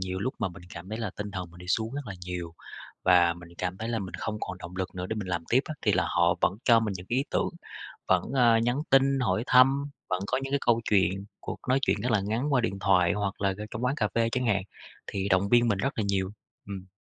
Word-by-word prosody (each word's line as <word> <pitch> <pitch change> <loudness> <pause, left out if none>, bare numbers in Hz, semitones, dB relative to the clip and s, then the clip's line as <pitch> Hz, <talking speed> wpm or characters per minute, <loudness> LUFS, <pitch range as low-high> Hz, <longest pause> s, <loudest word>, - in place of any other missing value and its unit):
nhiều 95 0 -3
lúc 130 +6 -2
mà 110 - 0
mình 90 0 -12
cảm 85 +2 -9
thấy 110 +2 -4
là 110 -4 -2
tinh 105 0 -4
thần 90 -3 -5
mình 85 - -15
đi 90 - -11
xuống 110 +5 0
rất 145 - -3
là 100 - -5
nhiều, 90 -2 -5 0.5
và 90 -2 +5
mình 85 0 -13
cảm 90 0 -3
thấy 110 +3 -4
là 115 -2 -1
mình 95 -2 -6
không 105 -1 -3
còn 95 -2 -4
động 90 0 -9
lực 95 0 -4
nữa 90 0 -3
để 110 - -2
mình 105 -3 -4
làm 85 -2 -2
tiếp 125 - +5
á, 155 - -4
thì - - +3
là - - +3
họ - - +3
vẫn - - +3
cho 115 -2 +7
mình 110 -3 -1
những 90 - -10
cái 120 - +1
ý 135 - +2
tưởng, - - +1 0.6
vẫn, 90 -1 +3
ờ, 120 -3 +5
nhắn 120 +5 +1
tin 135 0 +4
hỏi 120 -2 +1
thăm, 135 +2 +5 0.2
vẫn 90 0 0
có - - +1
những 135 - -5
cái 140 - +3
câu 115 -1 +4
chuyện, 95 -1 +2
cuộc - - -6
nói 130 +1 +4
chuyện 100 - +1
rất 125 +2 0
là 110 - +4
ngắn 115 +9 -1
qua 125 - +4
điện 100 -4 -2
thoại 90 -2 +3
hoặc 100 -1 -3
là, 100 -1 +2
ờ, 105 - -5
trong 115 +3 -3
quán 130 +3 +1
cà 110 -8 +1
phê 115 0 +2
chẳng 125 0 0
hạn, 100 -4 +2 0.4
thì 100 0 -2
động 95 +1 +3
viên 120 0 +5
mình 105 - +2
rất 135 +8 0
là 110 - +1
nhiều. 95 -1 0 0.4
Ừm. 95 -2 -7
105 Hz, 280 wpm, -28 LUFS, 95-120 Hz, 0.6 s, cho